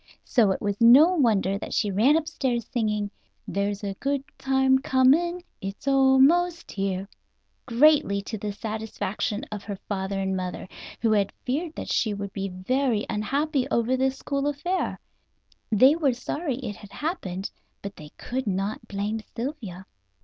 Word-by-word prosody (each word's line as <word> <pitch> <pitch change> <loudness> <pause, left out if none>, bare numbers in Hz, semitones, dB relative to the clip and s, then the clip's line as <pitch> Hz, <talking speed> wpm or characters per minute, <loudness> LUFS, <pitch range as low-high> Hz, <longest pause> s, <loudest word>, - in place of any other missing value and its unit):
So 230 -6 +3
it 190 - -1
was 205 0 -2
no 255 +8 +8
wonder 210 - +2
that - - -5
she 205 - +1
ran 240 +11 +4
up 320 -1 -2
stairs 240 -7 -1
singing: 210 -5 -1 0.4
"There's 200 +1 -2
a 200 -1 -2
good 280 0 -1 0.2
time 265 -1 +3
coming, 295 +8 +3 0.2
It's 195 +7 -7
almost 275 +6 +4
here," 195 -1 -2 0.6
greatly 245 -5 +4
to 220 - -5
the 210 0 -4
satisfaction 215 0 -3
of 210 -2 -5
her 200 -1 -4
father 195 -1 -2
and 190 0 -1
mother, 185 0 -4 0.4
who 225 - +3
had 205 -2 +2
feared 305 +6 -2
that - - -3
she 215 -3 +1
would 200 -1 -6
be 195 -1 -3
very 220 +5 0
unhappy 275 +6 0
over 235 +2 +1
the 265 +1 +2
school 275 +1 -3
affair. 350 +6 -2 0.7
They 260 +8 +6
were 295 -6 +2
sorry 275 +3 -3
it 230 -6 -6
had 200 -1 -13
happened, 200 - -4 0.3
but 200 0 -6
they 150 -1 -11
could 255 -1 -4
not 195 +2 -2
blame 205 +2 -2 0.2
Sylvia. 230 - -5
230 Hz, 155 wpm, -26 LUFS, 200-275 Hz, 0.7 s, no